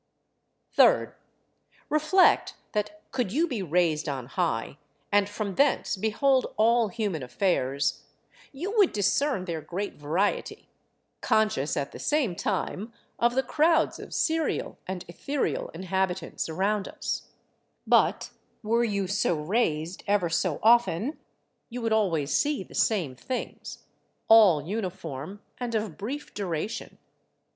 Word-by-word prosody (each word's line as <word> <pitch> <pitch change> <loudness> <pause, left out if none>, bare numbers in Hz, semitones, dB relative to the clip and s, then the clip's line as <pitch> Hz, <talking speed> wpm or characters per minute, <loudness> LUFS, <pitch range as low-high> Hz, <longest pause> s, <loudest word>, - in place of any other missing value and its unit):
Third, - - +4 0.7
reflect 310 +5 +3 0.2
that 235 +10 -3
could 250 -7 -1
you 320 +9 +2
be 245 -10 -3
raised 165 -3 +1
on 135 -3 -4
high, 140 -3 -2 0.3
and 205 0 +3
from 205 -1 -4
thence 280 +1 +2
behold 240 +6 +1
all 230 +1 +4
human 200 -6 -2
affairs, 140 -1 0 0.5
you 355 +10 -4
would 395 - +5
discern 210 +1 +1
their 165 -3 -4
great 185 +6 -4
variety, 165 +8 -1 0.5
conscious 215 -10 +1
at 140 -1 -2
the - - -10
same 280 - +1
time 205 +3 -2 0.3
of 240 +1 +2
the 265 - +2
crowds 320 +5 +2
of - - -9
serial 320 -1 -1
and 185 -1 -5
etherial 275 - -2
inhabitants 185 -1 -2
around 195 +5 0
us; - - -4 0.6
but - - +3 0.3
were 230 +2 +2
you 200 -4 0
so 190 -2 +1
raised 165 -1 -1
ever 200 -4 +2
so 165 -1 0
often, 235 - +3 0.5
you 245 - -5
would 225 -2 0
always 165 -10 +1
see 290 -7 +1
the - - -16
same 180 - +1
things, 250 - -6 0.4
all 205 -10 +7
uniform 180 -2 -5 0.2
and 240 -2 -3
of 210 -7 -2
brief 270 +8 -6
duration. 195 +1 -4
205 Hz, 125 wpm, -27 LUFS, 170-240 Hz, 0.7 s, all